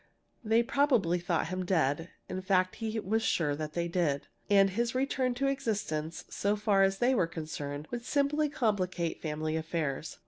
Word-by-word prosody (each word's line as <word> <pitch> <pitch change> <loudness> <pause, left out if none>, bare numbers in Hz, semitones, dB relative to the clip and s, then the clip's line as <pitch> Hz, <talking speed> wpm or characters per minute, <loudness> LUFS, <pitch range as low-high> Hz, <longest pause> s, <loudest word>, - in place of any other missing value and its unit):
They 225 +1 +3
probably 235 - +2
thought 175 -1 -1
him 185 0 -2
dead 165 -2 +1 0.2
in 185 - -4
fact 185 -1 +1
he 225 -1 -2
was 220 +3 0
sure 150 -9 +1
that 155 0 -5
they 170 0 -1
did. 170 -5 0 0.2
And 195 -1 +5
his 235 +4 -1
return 260 -1 0
to 275 +3 -1
existence, 210 - -2
so 200 +1 0
far 205 -2 +2
as 195 0 +3
they 245 +4 +3
were 190 -9 +2
concerned, 150 -2 -5
would 240 -1 -4
simply 290 +3 +1
complicate 190 - -1
family 155 0 -2
affairs. 160 -2 -3
185 Hz, 170 wpm, -30 LUFS, 160-230 Hz, 0.2 s, And